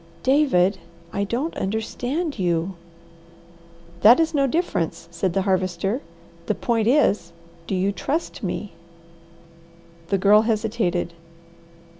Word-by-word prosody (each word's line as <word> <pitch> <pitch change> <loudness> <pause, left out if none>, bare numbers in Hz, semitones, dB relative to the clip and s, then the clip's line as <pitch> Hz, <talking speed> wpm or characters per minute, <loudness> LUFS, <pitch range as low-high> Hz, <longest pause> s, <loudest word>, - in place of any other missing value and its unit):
"David, 235 -10 +3 0.3
I 200 - 0
don 255 +10 -2
t - - -7
understand 245 - -2
you!" 175 0 0 1.3
"That 235 +7 +8
is 325 0 +1
no 275 -2 +2
difference," 260 - -1
said 170 +1 -1
the 195 - +1
Harvester. 190 +4 0 0.5
"The - - +1
point 225 -2 0
is, 210 - +2 0.3
do 195 - -1
you 190 +2 +1
TRUST 290 - -3
me?" 185 0 -4 1.3
The 195 - +1
Girl 205 +3 +6
hesitated. 215 -6 -1
205 Hz, 115 wpm, -23 LUFS, 185-250 Hz, 1.3 s, That